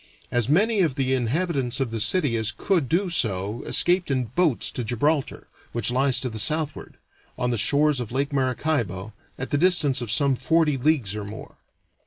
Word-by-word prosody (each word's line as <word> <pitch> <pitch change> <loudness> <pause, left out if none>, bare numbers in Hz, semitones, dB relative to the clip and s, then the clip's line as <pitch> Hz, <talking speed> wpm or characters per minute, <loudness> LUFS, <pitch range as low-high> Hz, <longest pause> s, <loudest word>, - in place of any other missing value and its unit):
As 120 0 0
many 210 +8 +2
of 160 -8 +1
the 130 -1 0
inhabitants 130 0 -1
of 130 -4 -2
the 115 - -3
city 120 - +1
as 110 -1 +1
could 160 - -1
do 185 +6 +1
so 105 - +1
escaped 175 -1 +2
in 130 -2 0
boats 165 -7 +2
to 125 - -4
Gibraltar, 135 +6 -1 0.3
which 120 0 0
lies 130 +1 +2
to 130 - -3
the 110 - -3
southward, 155 +6 -2 0.4
on 125 0 -1
the - - 0
shores 145 +4 +3
of 120 -3 -6
Lake 140 +3 -2
Maracaibo, 125 - -2 0.2
at 130 - -5
the 145 - +1
distance 155 -7 +3
of 120 - -5
some 135 +4 +2
forty 150 +3 +1
leagues 130 -7 0
or 105 - -5
more. 105 +2 -10
130 Hz, 185 wpm, -24 LUFS, 115-155 Hz, 0.4 s, shores